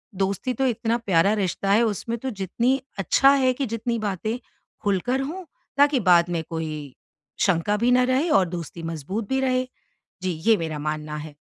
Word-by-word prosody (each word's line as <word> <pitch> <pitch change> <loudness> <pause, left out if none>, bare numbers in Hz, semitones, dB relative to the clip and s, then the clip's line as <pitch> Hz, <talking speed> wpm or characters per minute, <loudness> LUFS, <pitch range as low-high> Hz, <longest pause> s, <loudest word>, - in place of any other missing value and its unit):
दोस्ती 195 +6 -1
तो 265 +3 0
इतना 230 -1 0
प्यारा 200 -3 +2
रिश्ता 195 +2 -1
है, 215 +4 +5
उसमें 230 +1 -2
तो 265 - -3
जितनी, 235 +5 0 0.2
अच्छा 270 +8 +5
है 265 -2 +3
कि 275 +2 -2
जितनी 230 0 -2
बातें 215 +5 -2 0.5
खुलकर 205 +6 0
हों, 330 +8 -5 0.3
ताकि 285 -2 +4
बाद 170 0 +5
में 160 - -2
कोई 155 -4 -5 0.5
शंका 195 +3 +1
भी 245 - +4
ना 250 0 +5
रहे 260 +6 +1
और 245 -11 +4
दोस्ती 170 -1 -6
मज़बूत 165 +7 -4
भी 265 - +1
रहे। 255 -1 +1 0.5
जी, 185 0 -1
ये 225 -1 +5
मेरा 160 -3 -4
मानना 150 0 -3
है। 150 -1 -8
210 Hz, 180 wpm, -24 LUFS, 170-255 Hz, 0.5 s, है